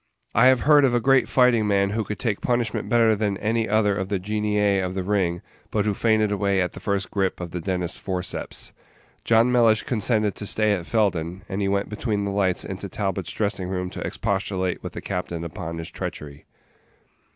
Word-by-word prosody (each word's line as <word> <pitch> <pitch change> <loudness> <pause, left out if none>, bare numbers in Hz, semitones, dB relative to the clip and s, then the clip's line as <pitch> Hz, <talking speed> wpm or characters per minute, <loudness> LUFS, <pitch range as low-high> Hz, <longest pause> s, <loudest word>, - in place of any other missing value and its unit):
I 125 +4 +6
have 130 -1 +5
heard 150 -1 +6
of 125 -3 +3
a - - +3
great 135 +2 +3
fighting 125 -4 +4
man 100 -1 +2
who 110 +1 -1
could 105 +1 -5
take 110 -5 -2
punishment 120 -3 -1
better 115 -2 +4
than 100 -2 -1
any 110 +2 0
other 105 -1 +2
of 95 -1 -3
the 100 - 0
genii 105 0 +1
of 95 0 -3
the 95 - -2
ring, 90 -3 0 0.3
but 105 -1 0
who 105 - +1
fainted 110 0 +2
away 100 -1 +1
at 90 -1 0
the - - -10
first 100 -1 -2
grip 95 -2 -1
of 85 -2 -6
the 90 - -4
dentist's 90 -1 -3
forceps. 95 -1 -4 0.5
John 115 +2 +4
Mellish 115 -3 +4
consented 110 -3 0
to 105 - -4
stay 110 +1 +2
at 90 -4 -3
Felden, 95 -5 0
and 100 +1 -3
he 100 - +1
went 100 0 0
between 105 -2 -2
the 100 - -2
lights 95 -2 0
into 95 +1 -6
Talbot's 95 -2 -3
dressing 100 -3 -2
room 90 -1 -3
to - - -7
expostulate 95 -2 -2
with - - -7
the - - -6
captain 90 -3 -4
upon 85 0 -6
his 85 -1 -6
treachery. 75 0 -7
100 Hz, 205 wpm, -24 LUFS, 95-110 Hz, 0.5 s, I